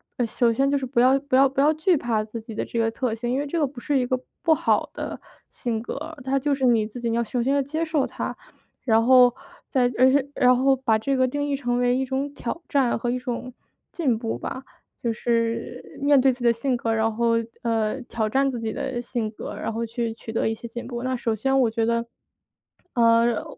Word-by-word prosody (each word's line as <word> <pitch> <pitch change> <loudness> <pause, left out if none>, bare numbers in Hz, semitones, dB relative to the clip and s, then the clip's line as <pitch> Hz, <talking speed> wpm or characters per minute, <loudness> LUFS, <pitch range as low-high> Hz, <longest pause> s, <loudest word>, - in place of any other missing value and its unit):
呃， 245 - 0
首 230 +1 +1
先 275 +3 +1
就 285 - +2
是 270 - -3
不 245 -1 +1
要 260 +2 +5
不 280 -1 -1
要 270 +1 +6
不 270 +1 -4
要 295 +2 +5
惧 320 +3 +2
怕 230 -5 0
自 215 +2 -7
己 225 0 -9
的 - - -1
这 230 - -3
个 225 0 +2
特 240 0 -2
性， 235 +2 -4
因 260 - 0
为 290 - -2
这 325 +4 -2
个 295 - +2
不 255 -2 -11
是 285 -2 +1
一 250 - 0
个 255 - +1 0.2
不 325 -2 +4
好 - - +1
的 - - -5 0.3
性 225 -3 -3
格， 310 +6 -6
它 270 +1 +1
就 285 +1 +1
是 270 - -5
你 225 -3 +3
自 240 +3 -9
己 235 - -1
你 230 - 0
要 235 - 0
首 240 +1 -1
先 270 +2 +1
要 280 - +3
接 310 +4 -2
受 315 -4 0
它。 - - -5 0.5
然 225 -2 +3
后 250 -1 +6 0.3
再 250 -3 +2
而 260 +1 +7
是 280 +1 +1
然 250 -2 +4
后 270 +1 +4
把 230 -4 +2
这 270 +5 -1
个 260 0 +3
定 290 +3 -2
义 280 - +1
成 245 -3 -1
为 245 0 +2
一 265 - 0
种 270 +2 -3
挑 285 +6 -5
战 270 -4 +2
和 240 +1 -2
一 250 - -1
种 250 0 -5 0.4
进 275 -10 0
步 225 0 -3
吧。 260 - -5 0.4
就 235 -1 0
是 230 0 -2
面 285 0 +5
对 265 0 +5
自 250 - -13
己 245 - -4
的 235 - +5
性 250 +3 -1
格， 230 -1 -1
然 220 0 0
后， 235 0 +2 0.3
呃， 225 +1 0
挑 220 -2 -2
战 275 +4 +2
自 240 - -4
己 220 -1 -3
的 265 -2 -3
性 235 -2 -3
格， - - -7
然 - - -3
后 230 +1 -2
去 230 0 -3
取 225 0 -9
得 225 - 0
一 - - -1
些 235 - -9
进 240 +1 -7
步。 240 -1 -5
那 255 0 -1
首 230 -2 -1
先 270 +5 +1
我 245 - +3
觉 225 0 0
得， 235 0 0 0.9
呃， 230 -1 +3
245 Hz, 270 characters per minute, -24 LUFS, 230-270 Hz, 0.9 s, 而